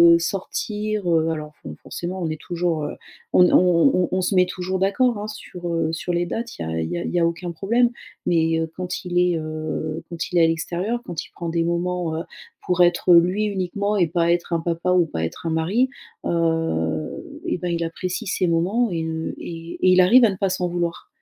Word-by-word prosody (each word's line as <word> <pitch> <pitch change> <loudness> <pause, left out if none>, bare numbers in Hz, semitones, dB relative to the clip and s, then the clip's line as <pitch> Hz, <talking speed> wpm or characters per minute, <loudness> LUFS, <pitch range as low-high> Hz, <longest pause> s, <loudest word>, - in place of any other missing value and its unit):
heu, 170 - +2
sortir, 205 +2 -2
heu, 160 0 +3
alors 155 -1 -5
fo - - -7
forcément 180 +2 -5
on 165 - -1
est 155 -1 -4
toujours, 170 -3 -1
heu, - - -5 0.4
on 180 0 +7
est - - +1
on 180 +8 +5
on - - -1
on 185 0 +1
se 185 +2 0
met 180 0 +6
toujours 185 +1 -3
d'accord, 215 +5 +2
hein, 205 +1 -4
sur, 180 -4 -8
heu, 165 -1 0
sur 175 +2 -3
les 175 0 +1
dates, 230 +5 -4
il 80 - -3
y - - -5
a 80 0 -1
il 80 - -3
y - - -1
a - - -3
il - - -3
y 175 - +2
a 170 - +3
aucun 170 +1 -2
problème 230 +8 +2 0.4
mais 165 -1 +2
heu, 160 0 -2
quand 180 +1 -4
il 175 0 -2
est, 180 -2 +3
heu, 155 0 -4
quand 170 +1 -5
il 180 - +1
est 170 - +6
à 165 - +6
l'extérieur, 175 +8 -2
quand 165 -3 -4
il - - -18
prend 170 -2 -5
des 165 0 +1
moments, 170 -1 -1
heu, 165 - -3 0.4
pour 180 0 +4
être 175 0 +4
lui 180 +5 +4
uniquement 200 +1 -1
et 180 - +4
pas 170 +1 +1
être 175 0 0
un 165 - +2
papa 170 +2 -1
ou 180 -2 +4
pas 80 - -3
être 80 - -7
un - - +1
mari, 185 +11 +1 0.4
heu 160 - -1
et - - 0
bah, 175 0 -3
il 170 0 -1
apprécie 185 +5 -4
ces 185 -1 +1
moments 190 +9 +1
et 165 -2 -1
heu 160 0 -3
et 165 0 -7
et 185 - +5
il 185 0 +6
arrive 235 +7 +7
à - - +4
ne 195 - -3
pas 195 -2 +1
s'en 180 -1 -1
vouloir. 175 -1 -3
175 Hz, 240 wpm, -23 LUFS, 165-185 Hz, 0.4 s, on